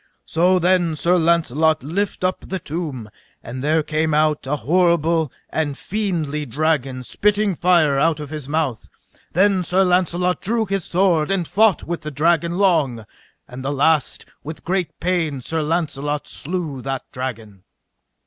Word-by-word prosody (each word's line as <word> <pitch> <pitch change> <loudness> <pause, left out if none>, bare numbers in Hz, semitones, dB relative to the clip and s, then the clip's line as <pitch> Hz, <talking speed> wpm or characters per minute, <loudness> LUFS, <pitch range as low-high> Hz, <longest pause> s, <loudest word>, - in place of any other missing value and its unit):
So 180 +3 +3
then 175 -2 +2
Sir 175 +4 +2
Launcelot 160 -3 +2
lift 185 +7 -2
up 185 0 0
the 190 - -2
tomb, 145 - -5 0.3
and 130 +3 -6
there 155 +1 +2
came 155 0 0
out 150 -2 +1
an 150 +2 0
horrible 165 -2 +2 0.2
and 155 -3 -1
a - - -13
fiendly 160 -7 -2
dragon, 135 -2 -1
spitting 205 - +1
fire 165 -5 +3
out 160 +1 +2
of 150 -1 -7
his 150 -3 -6
mouth. 150 -7 -2 0.4
Then 190 +1 +3
Sir 180 +2 +2
Launcelot 180 0 +1
drew 225 +2 0
his 195 -3 -2
sword 175 -4 +2
and 190 -4 0
fought 215 -1 +3
with 170 0 -4
the 150 - -5
dragon 170 +3 +1
long, 155 - +2 0.4
and 130 +1 -9
at 135 - -2
the - - -1
last 145 +1 +1 0.2
with 155 +2 -8
great 180 -3 -2
pain 165 -6 0
Sir 160 +6 -2
Launcelot 150 -2 -2
slew 160 -5 -4
that 135 0 -3
dragon. 110 -6 -6
160 Hz, 160 wpm, -21 LUFS, 145-180 Hz, 0.4 s, So